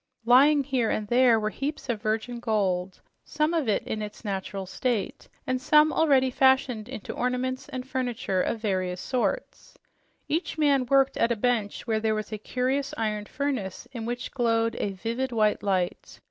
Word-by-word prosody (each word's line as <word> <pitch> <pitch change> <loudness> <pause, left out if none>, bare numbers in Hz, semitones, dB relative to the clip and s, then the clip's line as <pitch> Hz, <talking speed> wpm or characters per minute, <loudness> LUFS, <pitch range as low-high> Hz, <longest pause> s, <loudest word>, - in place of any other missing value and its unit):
Lying 280 +4 +6
here 255 -4 0
and 210 - -1
there 240 -2 +5
were 215 0 -1
heaps 285 +5 -4
of 230 -4 -2
virgin 225 +2 -2
gold, 195 -5 -1 0.2
some 305 +2 0
in 220 -7 -1
its 210 +2 -8
natural 195 -1 -3
state 210 +3 -2 0.2
and 255 0 -1
some 300 +3 +5
already 270 -5 +3
fashioned 260 -4 +2
into 240 -6 -6
ornaments 250 +1 -2
and 255 0 -6
furniture 245 -8 -1
of 230 - -1
various 185 -4 -1
sorts. 260 - -3 0.5
Each 320 +1 -2
man 280 -4 +3
worked 270 +1 +3
at 230 - +2
a - - +2
bench 220 -2 -1
where 220 -2 0
there 220 0 +1
was 215 +1 -4
a 215 - -4
curious 260 +5 -1
iron 210 -2 -2
furnace 255 -8 -3
in 235 -4 -6
which 245 +1 -4
glowed 230 -2 +1
a 200 - -1
vivid, 235 +7 -3
white 215 -2 +2
light. 185 -3 -2
240 Hz, 165 wpm, -26 LUFS, 215-260 Hz, 0.5 s, Lying